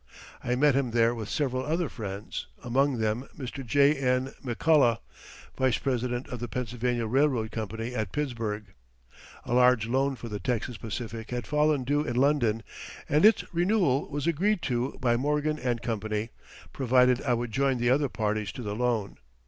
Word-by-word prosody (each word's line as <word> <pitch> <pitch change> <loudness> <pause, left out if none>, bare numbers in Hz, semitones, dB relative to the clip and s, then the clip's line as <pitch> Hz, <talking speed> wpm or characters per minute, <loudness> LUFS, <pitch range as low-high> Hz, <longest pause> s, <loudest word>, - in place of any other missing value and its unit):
I 125 - 0
met 145 +2 +4
him 135 -1 +1
there 115 0 +3
with 110 -3 -6
several 130 -4 -1
other 165 +3 0
friends, 105 -5 -6 0.2
among 130 +2 +1
them 110 +4 -1
Mr. 135 -1 -6
J.N. 135 -1 +2
McCullough, 125 -1 +3 0.6
vice 130 -3 +2
president 125 -1 -2
of 125 - -5
the 120 - -4
Pennsylvania 120 +1 -2
Railroad 125 -2 +1
Company 115 +2 -4
at 110 -6 -2
Pittsburgh. 110 -8 -3 0.7
A - - -2
large 125 -2 +4
loan 135 +3 +1
for 120 - -8
the 105 -2 -5
Texas 120 +3 -2
Pacific 115 +1 -6
had 125 -2 -3
fallen 150 -1 +2
due 145 +3 +1
in 125 -6 -3
London 125 -5 +2 0.4
and 150 +2 +2
its 220 +2 +6
renewal 175 -6 +2
was 145 0 -3
agreed 175 +4 +1
to 125 +1 -1
by 120 -3 +2
Morgan 150 +3 0 0.2
& - - -17
Co., 115 -3 -1 0.7
provided 125 -1 +3
I 125 -3 +1
would 120 0 -3
join 135 +2 +1
the 120 +1 +2
other 140 +1 +2
parties 105 -2 -2
to 125 - -7
the 105 -1 -3
loan. 115 -4 -1
125 Hz, 165 wpm, -28 LUFS, 115-140 Hz, 0.7 s, its